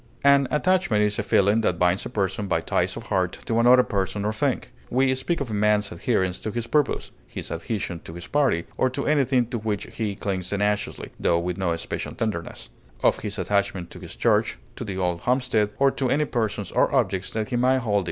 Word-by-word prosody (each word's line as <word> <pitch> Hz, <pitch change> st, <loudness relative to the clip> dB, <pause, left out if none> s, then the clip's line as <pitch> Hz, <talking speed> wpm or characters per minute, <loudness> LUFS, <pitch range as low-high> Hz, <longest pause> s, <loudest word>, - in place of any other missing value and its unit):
An 140 Hz, -1 st, +5 dB
attachment 165 Hz, -, +2 dB
is 105 Hz, 0 st, 0 dB
a -, -, +3 dB
feeling 100 Hz, +3 st, +3 dB
that 90 Hz, -5 st, +1 dB
binds 90 Hz, +2 st, +1 dB
a -, -, -9 dB
person 100 Hz, -2 st, -1 dB
by -, -, +1 dB
ties -, -, -1 dB
of -, -, -6 dB
heart -, -, 0 dB
to 115 Hz, -, +1 dB
another 125 Hz, +2 st, +7 dB
person 100 Hz, -1 st, -2 dB
or 105 Hz, -, 0 dB
thing; 135 Hz, +4 st, 0 dB, 0.3 s
we 130 Hz, +1 st, +3 dB
speak 130 Hz, +6 st, -1 dB
of 135 Hz, -5 st, -3 dB
a -, -, -3 dB
man's 105 Hz, 0 st, +2 dB
adherence 95 Hz, 0 st, 0 dB
to -, -, -3 dB
his 115 Hz, +2 st, -3 dB
purpose, 145 Hz, +2 st, 0 dB, 0.2 s
his -, -, -7 dB
adhesion 90 Hz, 0 st, -3 dB
to 80 Hz, -, -10 dB
his 85 Hz, -, -7 dB
party, 135 Hz, -, +1 dB
or 130 Hz, -, +3 dB
to 140 Hz, +2 st, -4 dB
anything 135 Hz, -4 st, +3 dB
to 120 Hz, 0 st, -4 dB
which 105 Hz, -2 st, -3 dB
he 105 Hz, -3 st, -1 dB
clings 95 Hz, -2 st, -3 dB
tenaciously, 105 Hz, +1 st, -1 dB
tho 85 Hz, -, +2 dB
with 85 Hz, +1 st, -2 dB
no 85 Hz, -3 st, +1 dB
special 85 Hz, -, -5 dB
tenderness; 105 Hz, -7 st, -4 dB, 0.3 s
of -, -, +3 dB
his -, -, -4 dB
attachment 100 Hz, -3 st, -1 dB
to -, -, -10 dB
his -, -, -9 dB
church, -, -, +2 dB, 0.2 s
to -, -, -5 dB
the 95 Hz, -3 st, -5 dB
old 90 Hz, -2 st, 0 dB
homestead, 125 Hz, -2 st, +1 dB
or 135 Hz, 0 st, +4 dB
to 130 Hz, -2 st, -1 dB
any 150 Hz, +4 st, +2 dB
persons 110 Hz, -7 st, -2 dB
or -, -, +2 dB
objects 95 Hz, -7 st, +1 dB
that 110 Hz, -1 st, -3 dB
he 125 Hz, -, -1 dB
may 130 Hz, +2 st, +3 dB
hold 115 Hz, -5 st, -2 dB
dear. 100 Hz, -, +4 dB
105 Hz, 220 wpm, -24 LUFS, 95-125 Hz, 0.3 s, another